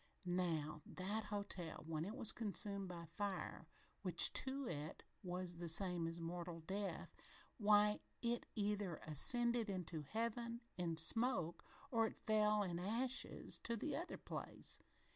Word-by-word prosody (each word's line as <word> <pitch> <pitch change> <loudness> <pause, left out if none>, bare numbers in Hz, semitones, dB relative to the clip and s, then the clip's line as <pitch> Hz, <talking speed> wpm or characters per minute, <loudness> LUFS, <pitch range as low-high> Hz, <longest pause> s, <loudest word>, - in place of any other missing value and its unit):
Now, 165 -4 -1
that 205 +4 -3
hotel, 200 -6 -5
when 160 0 -3
it 210 - -5
was 220 - +2
consumed 200 -3 +1
by 170 -2 -7
fire, 185 -1 -4 0.3
which 180 -4 +6
to 270 +1 +2
it 155 -6 -5 0.2
was 180 -2 -4
the 170 0 -5
same 175 0 +5
as 165 +1 -5
mortal 170 0 -5
death, 195 +4 -4 0.4
why, 210 0 +4 0.2
it 235 0 -1
either 205 -4 -1
ascended 235 - +4
into 175 -4 -4
Heaven, 230 - -3
in 170 -2 -2
smoke, 180 0 +4 0.3
or 225 -2 +3
it - - -9
fell, 210 -1 +3
in 175 -3 -3
ashes 235 +8 +1
to 235 0 -1
the 295 +6 -2
other 340 +3 -4
place. - - -4
195 Hz, 140 wpm, -41 LUFS, 170-220 Hz, 0.4 s, which